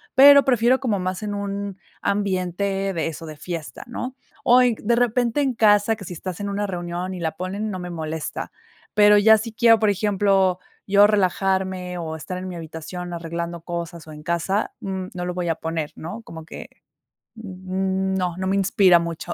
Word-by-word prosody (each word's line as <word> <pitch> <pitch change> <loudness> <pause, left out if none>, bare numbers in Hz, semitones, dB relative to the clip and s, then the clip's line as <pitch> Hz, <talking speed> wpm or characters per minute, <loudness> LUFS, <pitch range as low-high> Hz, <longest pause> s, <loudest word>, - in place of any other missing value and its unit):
pero 280 +1 +9
prefiero 250 0 +3
como 220 -6 0
más 185 +2 -3
en 205 -1 -3
un 200 -1 -4 0.2
ambiente 195 0 -1
de 165 - -1
eso 165 0 -6
de 155 -1 -9
fiesta, 165 -1 -6
¿no?, 250 +2 -5 0.3
o 250 +1 +6
en 245 -2 +3
de 235 +2 +3
repente 245 +2 +1
en 265 -3 +1
casa, 215 -1 +4
que 200 -3 -10
si 175 - -6
estás 180 +2 -6
en 200 0 -3
una 205 +1 -1
reunión 175 0 -4
y 185 - -6
la 160 -2 -2
ponen, 195 +5 -4
no 190 - -4
me 180 0 -6
molesta. 160 -1 -5 0.4
Pero 210 0 +7
ya 220 +1 +7
si 230 +2 -5
quiero, 225 +1 +5
por 215 -1 +2
ejemplo, 195 -2 +2 0.3
yo 200 +1 +6
relajarme 190 -2 0
o 160 -1 -4
estar 180 +3 -6
en 185 - -6
mi 180 - -6
habitación 170 +2 -7
arreglando 170 0 -4
cosas 170 -1 -6
o 155 - -9
en 150 0 -11
casa, 175 +4 -1
mm, 190 -1 -4
no 180 -1 -4
lo 180 0 -3
voy 175 -2 -2
a 165 - +1
poner, 160 -2 -3
¿no?, 190 +8 -7
como 160 -5 -10
que, - - -9 0.7
mm, 190 -1 -2
no, 180 -2 -1
no 190 0 -3
me 195 +1 +1
inspira 190 -2 +5
mucho. 170 -1 -4
190 Hz, 195 wpm, -23 LUFS, 175-205 Hz, 0.7 s, pero